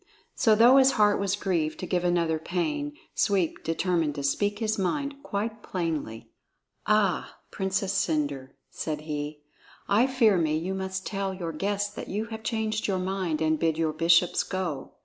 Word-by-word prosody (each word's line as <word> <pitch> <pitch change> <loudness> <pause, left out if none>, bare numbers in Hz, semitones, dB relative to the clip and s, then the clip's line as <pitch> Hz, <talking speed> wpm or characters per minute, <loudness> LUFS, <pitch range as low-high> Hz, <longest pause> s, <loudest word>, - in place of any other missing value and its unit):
So 220 -2 +4
though 240 +5 +7
his 270 0 +6
heart 210 -2 +3
was 200 0 0
grieved 170 -6 -1
to - - -3
give 180 -1 0
another 170 -2 +1
pain, 290 - -2 0.2
Sweep 190 -6 0
determined 165 -2 0
to 140 - -4
speak 205 +9 0
his 215 -2 -1
mind 280 +8 -2
quite 215 -2 -3
plainly. 160 - -4 0.6
"Ah, 210 -4 +1
Princess 190 0 -1
Cendre," 145 -7 -1 0.2
said 150 -2 -4
he, 150 -1 -5 0.5
"I 220 +6 +4
fear 230 -8 +3
me 155 -2 +1
you 175 +4 -3
must 190 0 -4
tell 195 -2 -2
your 170 -3 -4
guests 205 +5 -2
that - - -7
you 210 +3 -2
have 220 - -6
changed 220 -1 -1
your 195 -2 0
mind 185 -4 -2
and 155 -1 +1
bid 160 -1 +1
your 160 -1 0
bishops 170 +2 +4
go. 180 -8 -4
190 Hz, 170 wpm, -27 LUFS, 160-210 Hz, 0.6 s, though